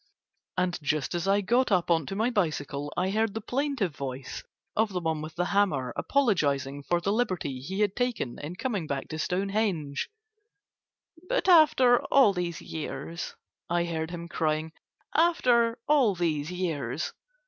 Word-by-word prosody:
And 180 -1 0
just 150 +1 -1
as 175 +2 -2
I 200 +1 +4
got 240 +5 +2
up 180 -2 +2
on 165 -4 +2
to 195 - -4
my 225 +4 +1
bicycle 145 - -1
I 185 +2 +1
heard 220 0 0
the - - -1
plaintive 245 - -1
voice 130 -1 -5 0.3
of 215 -2 +1
the 180 - 0
one 160 -2 -1
with 155 +1 -7
the 175 +1 0
hammer 145 -12 +2
apologizing 145 - +1
for 175 +4 0
the 195 +3 -1
liberty 185 - -1
he 190 +10 -4
had 205 -2 +2
taken 245 - -2
in 155 +5 -6
coming 205 -7 -2
back 140 -2 -3
to 155 - -5
Stonehenge. 185 -5 -1 1.2
"But - - +1
after 300 -8 +6
all 265 -8 +5
these 175 -2 -3
years," 160 +2 -5 0.3
I 170 0 +1
heard 160 -1 -3
him 170 -1 -6
crying, 160 -1 -1 0.4
"After 245 -8 +3
all 270 -10 +4
these 155 -4 -1
years...." 160 -6 -2
180 Hz, 160 wpm, -28 LUFS, 155-220 Hz, 1.2 s, after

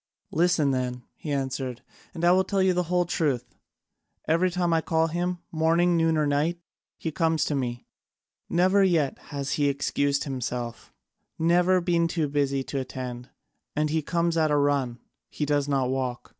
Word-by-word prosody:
"Listen 165 -4 +2
then," 125 -1 -2
he 150 - -6
answered, 130 -2 -3 0.3
"and 170 0 -1
I 175 - +6
will 185 +1 +4
tell 195 0 0
you 190 -1 +3
the 180 - +1
whole 180 0 +2
truth. 140 -8 -1 0.7
Every 170 +4 +3
time 175 -1 0
I 165 - +3
call 160 0 +1
him, 175 +2 -1
morning, 165 +2 +3
noon, 165 -1 +2
or 155 - +2
night, 150 +4 0 0.4
he 160 - -3
comes 160 -2 +1
to - - -1
me; 120 -3 -3 0.6
never 185 +3 +4
yet 165 -7 +1
has 140 -1 -4
he 145 -1 +2
excused 140 0 0
himself, 125 -3 -4 0.5
never 175 +3 +3
been 170 -1 +2
too 165 -2 -1
busy 140 -1 0
to 140 - -3
attend; 125 -1 -6 0.5
and 150 0 0
he 160 0 +1
comes 170 +2 0
at 155 -1 +3
a 150 - +3
run, 140 -4 +1 0.3
he 150 - -3
does 145 -1 +1
not 135 -3 +1
walk. 130 -2 -3
150 Hz, 170 wpm, -26 LUFS, 135-170 Hz, 0.7 s, I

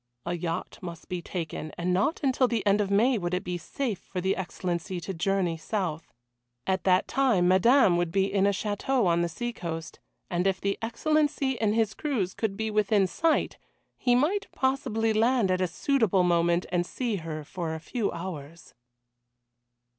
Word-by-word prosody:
A 170 - -1
yacht 170 -1 -4
must 170 -2 -8
be 180 -2 -3
taken, 160 -3 -5
and 180 +1 0
not 200 - +1
until 260 -1 +3
the 230 -4 -1
end 205 +1 +4
of 200 - -1
May 225 +4 +3
would 175 0 -1
it 180 - -2
be 180 0 -3
safe 230 - -3
for 185 - -6
the 190 +2 +1
Excellency 180 -1 -3
to 190 +3 -5
journey 180 -1 0
south. 165 -2 -3 0.5
At 190 -1 -1
that 185 -1 +4
time 240 -10 +2
Madame 190 +1 +5
would 175 -1 0
be 195 +2 +2
in 195 0 +2
a - - +5
château 210 +5 0
on 170 -1 +3
the 170 - 0
seacoast, 170 -6 -5 0.3
and 180 +2 0
if 190 -1 +1
the 200 0 -1
Excellency 290 +3 +1
in 220 -4 0
his 220 -2 +1
cruise 235 - -2
could 205 -3 -2
be 220 0 -2
within 210 -1 +3
sight, 320 - 0 0.4
he 245 -1 +2
might 370 +11 +1
possibly 225 -5 0
land 225 -2 +3
at 185 0 +1
a 185 - +2
suitable 205 - +2
moment 170 0 +2
and 175 -1 +2
see 230 +3 -2
her 160 -3 -5
for 160 +1 -4
a - - -5
few 215 +6 -2
hours. 170 -2 -8
195 Hz, 180 wpm, -27 LUFS, 175-230 Hz, 0.5 s, Madame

